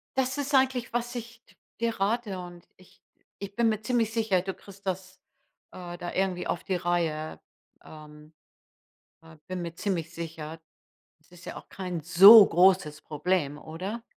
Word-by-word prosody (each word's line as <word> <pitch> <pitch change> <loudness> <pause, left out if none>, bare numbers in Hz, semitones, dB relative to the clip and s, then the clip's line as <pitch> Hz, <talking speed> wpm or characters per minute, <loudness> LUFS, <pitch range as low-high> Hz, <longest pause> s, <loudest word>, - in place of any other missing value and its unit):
das 265 +1 0
ist 285 0 -3
eigentlich, 260 -3 +2
was 240 +1 -2
ich 235 0 -8
d - - -24 0.3
dir 230 -3 -1
rate, 205 -1 -1
und 175 -1 -11
ich 185 - -22 0.4
ich 200 0 -8
bin 235 -1 +2
mir 215 -1 -2
ziemlich 225 -1 0
sicher, 215 -6 +1
du 190 0 -4
kriegst 200 0 -16
das, 190 0 -5 0.5
äh, 175 -1 -8
da 175 0 -6
irgendwie 190 -2 -1
auf - - -3
die 190 - -2
Reihe, 170 -3 -2 0.4
ähm 150 0 -14 0.9
äh, 160 -1 -16
bin 185 -1 -4
mir 170 -1 -6
ziemlich 175 -4 -3
sicher. 165 -1 -7 0.6
Es 155 - -30
ist 175 0 -15
ja - - -7
auch - - -13
kein 180 -4 -5
so 195 +6 +9
großes 180 -4 +3
Problem, 150 -1 -1
oder? 185 +10 -7
185 Hz, 165 wpm, -27 LUFS, 170-220 Hz, 0.9 s, so